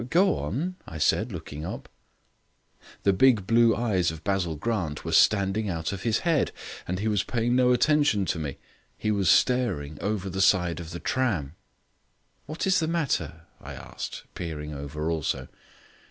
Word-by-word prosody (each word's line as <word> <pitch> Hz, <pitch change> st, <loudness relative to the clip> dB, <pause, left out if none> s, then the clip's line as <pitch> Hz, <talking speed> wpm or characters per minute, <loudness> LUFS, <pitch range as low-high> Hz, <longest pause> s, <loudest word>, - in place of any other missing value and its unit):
"Go 185 Hz, -, +3 dB
on," 140 Hz, -, -3 dB
I 80 Hz, -, -7 dB
said, 110 Hz, +9 st, +1 dB
looking 80 Hz, -4 st, -7 dB
up. -, -, -6 dB, 1.2 s
The 100 Hz, -, +4 dB
big 115 Hz, -1 st, +4 dB
blue 115 Hz, +1 st, +4 dB
eyes 100 Hz, -7 st, +1 dB
of 80 Hz, 0 st, -8 dB
Basil 95 Hz, -5 st, 0 dB
Grant 85 Hz, -4 st, -3 dB
were 80 Hz, -, -3 dB
standing 100 Hz, +1 st, +3 dB
out 80 Hz, +1 st, -2 dB
of 95 Hz, -, -6 dB
his 115 Hz, 0 st, 0 dB
head 165 Hz, -4 st, +2 dB, 0.4 s
and 90 Hz, -, -2 dB
he 105 Hz, +4 st, -2 dB
was 105 Hz, -2 st, +2 dB
paying 120 Hz, 0 st, 0 dB
no 125 Hz, -1 st, +4 dB
attention 135 Hz, -5 st, +3 dB
to 85 Hz, -, -1 dB
me. 75 Hz, -4 st, -4 dB, 0.4 s
He 110 Hz, -, -1 dB
was 100 Hz, -4 st, +1 dB
staring 80 Hz, -, +2 dB
over 100 Hz, -1 st, -2 dB
the 95 Hz, +1 st, -2 dB
side 90 Hz, -4 st, +3 dB
of 85 Hz, -2 st, -7 dB
the 85 Hz, +1 st, -6 dB
tram. 95 Hz, -, -1 dB, 0.9 s
"What 155 Hz, +3 st, -3 dB
is 190 Hz, -1 st, +3 dB
the 160 Hz, -, 0 dB
matter?" 110 Hz, -, -1 dB, 0.2 s
I -, -, -9 dB
asked, -, -, -7 dB
peering 75 Hz, -3 st, -5 dB
over 75 Hz, +3 st, -4 dB
also. 70 Hz, -5 st, -2 dB
95 Hz, 170 wpm, -26 LUFS, 80-120 Hz, 1.2 s, The